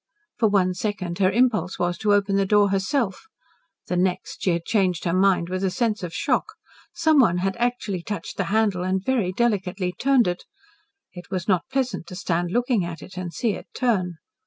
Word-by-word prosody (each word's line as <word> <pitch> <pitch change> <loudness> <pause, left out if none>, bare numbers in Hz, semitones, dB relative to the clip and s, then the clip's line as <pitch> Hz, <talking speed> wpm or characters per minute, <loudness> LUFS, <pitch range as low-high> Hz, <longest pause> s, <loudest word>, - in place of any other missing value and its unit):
For 220 - +4
one 185 -3 +2
second 185 -2 -3
her 185 -1 +4
impulse 220 -3 +1
was 175 0 0
to 210 -1 +3
open 200 -1 +1
the 195 - +3
door 205 0 +4
herself; 200 - -1 0.6
the 180 - -2
next, 180 -2 -1
she - - +1
had 170 -1 0
changed 185 -6 +1
her 170 - +1
mind 185 -2 +3
with 185 +1 -3
a 190 - +2
sense 220 +2 -1
of 180 -2 -5
shock. 280 - -1 0.4
Someone 270 - +3
had 190 +1 -1
actually 235 -6 -1
touched 200 -1 -6
the 195 - 0
handle 205 -1 +1
and 185 +1 -1
very 235 -9 +1
delicately 190 -4 0
turned 265 -2 +3
it. 175 0 -2 0.7
It 175 -1 -11
was 185 -2 -3
not 190 +5 +1
pleasant 255 -10 -1
to 180 - -8
stand 175 -2 -1
looking 240 0 +1
at 170 -1 -6
it 185 - -12
and 180 -1 -5
see 230 +5 0
it - - -7
turn. 190 -9 0
195 Hz, 195 wpm, -24 LUFS, 180-220 Hz, 0.7 s, For